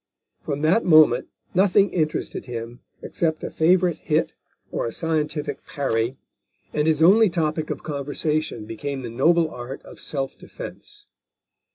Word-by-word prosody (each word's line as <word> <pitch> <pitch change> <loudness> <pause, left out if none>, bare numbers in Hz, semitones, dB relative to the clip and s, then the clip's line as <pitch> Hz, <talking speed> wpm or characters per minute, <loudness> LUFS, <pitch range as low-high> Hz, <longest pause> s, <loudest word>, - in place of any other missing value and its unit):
From 145 +1 -3
that 180 +9 +4
moment 155 -3 +5 0.3
nothing 195 +2 +4
interested 155 -3 -2
him 120 0 -6 0.2
except 160 -2 -1
a - - -4
favourite 175 0 +3
hit 155 0 0 0.4
or - - -1
a - - -4
scientific 150 -1 -2
parry, 125 -2 -1 0.6
and 150 +1 +1
his 160 0 +3
only 210 +5 +6
topic 155 -2 -1
of - - -4
conversation 145 -4 -2
became 135 +4 -5
the 120 - -5
noble 165 +6 +3
art 125 +2 -7
of - - -13
self 135 -2 -3
defence. 415 -4 -10
155 Hz, 140 wpm, -23 LUFS, 135-170 Hz, 0.6 s, only